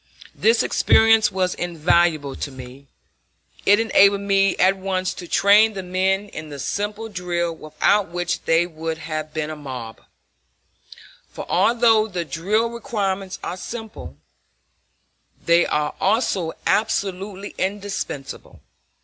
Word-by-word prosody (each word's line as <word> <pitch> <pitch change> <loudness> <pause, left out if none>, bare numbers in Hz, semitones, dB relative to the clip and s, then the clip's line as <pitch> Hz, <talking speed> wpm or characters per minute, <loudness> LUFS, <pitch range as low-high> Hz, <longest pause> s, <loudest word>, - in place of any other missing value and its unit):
This 225 +2 +2
experience 225 -1 +4
was 185 -1 0
invaluable 165 -4 +1
to - - -5
me. 130 +1 -12 0.8
It 205 +1 +6
enabled 200 -3 +4
me 195 -1 +2
at 190 +1 +4
once 185 -1 -2
to 175 - -9
train 210 +5 +5
the 190 -2 -5
men 190 +2 0
in 155 -4 -8
the 145 - -8
simple 205 +9 -3
drill 175 -4 -3
without 155 +6 +1
which 175 +1 -3
they 165 +1 +3
would 160 -1 -5
have 155 0 -5
been 155 0 -3
a - - -5
mob; 130 -6 -8 1.3
for - - -8
although 230 -2 +3
the 180 -5 -4
drill 210 +9 -1
requirements 195 -5 -3
are 180 - -4
simple, 185 - -8 1.3
they 170 +1 +4
are 150 0 -1
also 195 -5 +1
absolutely 195 -1 -1
indispensable. 195 -8 -5
185 Hz, 125 wpm, -22 LUFS, 160-205 Hz, 1.3 s, It